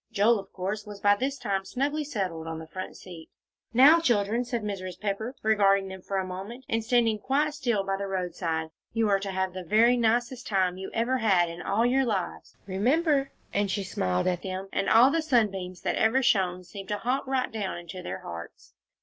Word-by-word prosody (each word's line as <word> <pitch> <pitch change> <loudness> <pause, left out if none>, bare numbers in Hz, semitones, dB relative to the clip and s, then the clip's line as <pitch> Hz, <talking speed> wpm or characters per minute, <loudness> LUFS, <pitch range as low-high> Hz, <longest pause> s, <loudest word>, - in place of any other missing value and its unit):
Joel, 220 +2 +3
of 195 0 -11
course, 200 +3 -4
was 205 -1 -8
by 205 0 +4
this 270 +6 -2
time 195 -6 -1
snugly 285 +8 -1
settled 190 - -3
on 165 0 -4
the 160 - -7
front 185 +4 -7
seat. 170 -3 -11 0.4
"Now, 275 +8 +7
children," 230 -5 +1
said 240 -2 -3
Mrs. 185 -3 -5
Pepper, 215 +5 -3
regarding 200 -3 +3
them 190 -1 -8
for 195 +1 -3
a 190 - 0
moment, 195 +8 -7
and 225 0 0
standing 225 -2 +2
quite 290 +6 +1
still 240 -9 0
by 195 0 -1
the 200 0 -4
roadside, 170 -4 -2 0.2
"you 225 -1 +2
are 195 -1 +3
to 195 0 -5
have 190 -1 -1
the 185 0 -6
very 230 +7 +4
nicest 240 +2 0
time 185 -3 +1
you 190 0 -6
ever 240 +3 0
had 185 -6 +3
in 170 +1 -7
all 215 +4 +1
your 265 +2 +3
lives. 205 -7 -3
Remember!" 275 - +1 0.2
and 200 0 +1
she 200 +1 -1
smiled 90 - -1
at 180 -1 0
them, 190 0 -5
and - - 0
all 240 +4 +7
the 330 - +1
sunbeams 195 - 0
that - - -1
ever 245 +5 +3
shone 185 -6 +2
seemed 195 +2 -10
to 210 - 0
hop 255 +5 -1
right 260 -1 0
down 205 -5 -3
into 175 +1 -8
their - - -6
hearts. 85 0 -9
205 Hz, 210 wpm, -27 LUFS, 185-240 Hz, 0.4 s, Now